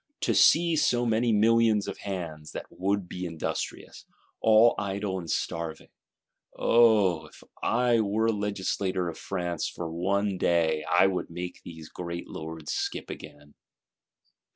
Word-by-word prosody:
To - - +1
see 170 0 +5
so 120 -5 +2
many 115 +1 +2
millions 110 -1 +3
of 100 - -6
hands, 85 -6 -6
that - - -5
would 100 0 -1
be 90 +1 -6
industrious, 80 -2 -5 0.4
all 110 +1 +6
idle 100 -1 -2
and 85 -2 -8
starving: 80 0 -3 0.7
Oh, 105 -9 +4
if - - -17 0.2
I 120 0 +2
were 110 +2 +1
legislator 100 -3 -2
of 85 - -8
France, 90 -4 -3
for 85 -2 -6
one 95 +3 -1
day, 80 -3 +2
I 90 - +6
would 95 -1 -1
make 90 +1 -6
these 80 -2 -10
great 85 -1 -6
lords 80 -1 -7
skip - - -3
again!" 75 0 -11
95 Hz, 135 wpm, -27 LUFS, 85-110 Hz, 0.7 s, all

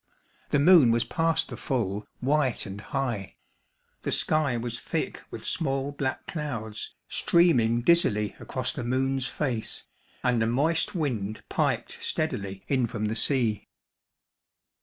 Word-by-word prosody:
The - - +3
moon 150 -3 +7
was 115 0 +3
past 165 -1 0
the - - -5
full, 105 -6 -2
white 135 -1 +1
and 100 0 -7
high; 120 -9 -3 0.7
the - - -2
sky 150 -5 +3
was 115 0 -3
thick - - -3
with - - -8
small 135 -2 -1
black 135 -2 -3
clouds, 115 -9 -4
streaming 120 -9 +3
dizzily 105 -11 +3
across - - -3
the - - -4
moon's 130 +2 0
face, 125 -4 -2 0.4
and 125 -2 +2
a 110 - +2
moist 150 +10 +1
wind 110 - -2
piped - - -1
steadily, 100 -1 -2
in 130 -4 +2
from 110 -1 -3
the 110 +1 -1
sea. 115 -3 0
125 Hz, 135 wpm, -27 LUFS, 110-145 Hz, 0.7 s, moon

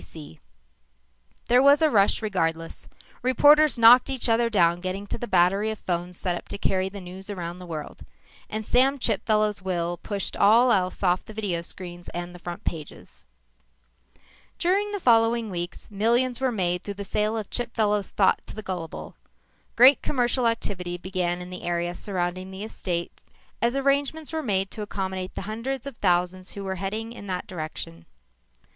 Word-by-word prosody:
S. - - -13
B. 155 - -10
C._" - - -23 1.1
There 245 +1 +5
was 280 +3 +6
a 310 - +4
rush 205 0 +3
regardless. 165 -5 -2 0.3
Reporters 295 +3 +5
knocked 235 +3 +7
each 265 -2 0
other 230 0 +3
down 175 -5 +3
getting 190 +2 -4
to - - -4
the 240 - -4
battery 195 +3 +3
of 220 - -4
phones 175 -1 -3
set 180 -3 -1
up - - -8
to - - -6
carry 190 -1 0
the 200 +1 -8
news 185 +2 -10
around 175 -3 -5
the 180 -1 -10
world. 155 -3 -7 0.5
And 215 0 -4
Sam 265 +5 +4
Chipfellow's 215 -3 +1
will 175 -2 -2
pushed 200 +3 -4
all 230 +5 +5
else 185 -2 0
off 180 -1 +2
the 215 - -12
video 195 -6 -2
screens 175 0 -8
and 175 0 -5
the 180 - -11
front 175 0 -7
pages. 155 - -6 1.3
During 400 +4 +1
the 405 - -3
following 230 - +3
weeks, 175 +3 -6
millions 235 +5 +1
were 260 -1 +2
made 180 -5 0
through 200 - -5
the 200 - -5
sale 210 +3 0
of 215 -3 -5
Chipfellow's 215 -4 0
thought 195 - +2
to - - -9
the 215 - -6
gullible. 180 -4 -6 0.6
Great 255 +4 +7
commercial 245 -2 +1
activity 180 -6 -2
began 180 -1 -2
in 180 - -10
the 180 - -7
area 175 0 -1
surrounding 185 -1 -3
the 190 +1 -7
estate 175 -5 -4 0.4
as 235 +2 +2
arrangements 280 +3 0
were 320 - -1
made 195 -6 -1
to 215 - -6
accommodate 190 -2 -4
the - - -4
hundreds 230 +6 -4
of 280 -3 -6
thousands 180 0 0
who 200 - -6
were 190 -1 -3
heading 220 +4 -3
in 205 - -10
that 185 -1 -3
direction. 155 - -7
200 Hz, 175 wpm, -25 LUFS, 180-230 Hz, 1.3 s, knocked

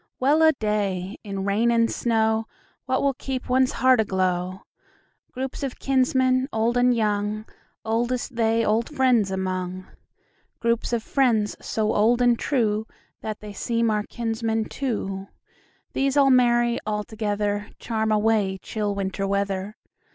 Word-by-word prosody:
Well 290 +5 +3
a 320 0 +7
day! 205 -5 -2
in 195 -2 -4
rain 210 +4 +2
and 230 -1 +3
snowWhat 220 -2 +1 0.6
will 280 -1 +2
keep 260 0 -5
one's 255 0 +2
heart 255 -2 +4
aglow? 185 -2 -1 0.7
Groups 265 +2 -5
of 275 -3 -4
kinsmen, 260 0 +2
old 225 +2 +1
and 245 0 +4
young, 210 -1 -1 0.4
Oldest 240 +3 -1
they 225 0 +2
old 220 +2 +1
friends 255 -8 +2
among; 185 -1 -3 0.7
Groups 235 0 0
of 235 -2 0
friends, 225 -7 +1
so 215 -1 0
old 230 +4 +3
and 245 -1 +4
trueThat 220 -3 -3
they 210 -1 -8
seem 230 +1 0
our 210 0 +1
kinsmen 225 0 -2
too; 195 -8 -3 0.7
These 275 +1 +1
all 275 -1 +5
merry 240 -1 +3
all 210 0 -2
togetherCharm 210 +1 -2
away 210 -2 +2
chill 205 +1 -3
Winter 195 0 -2
weather. 200 +1 -2
220 Hz, 130 wpm, -24 LUFS, 205-245 Hz, 0.7 s, a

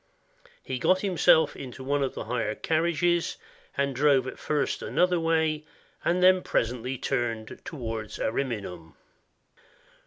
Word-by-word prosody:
He 130 -1 -4
himself 185 -3 +4
got - - -9
into 130 -1 -8
one 140 +2 0
of 135 - -1
the - - -4
hired 115 -2 -3
carriages, 170 +1 +1 0.4
and 140 -1 0
drove 140 -1 +4
at 130 - -7
first 150 -2 -1
another 180 -1 +2
way, 160 -2 +1 0.4
but 180 +1 +4
presently 125 +2 -1
turned 115 -4 -2
towards 115 -6 -5
Ariminum. 100 - -3
140 Hz, 120 wpm, -27 LUFS, 120-165 Hz, 0.4 s, himself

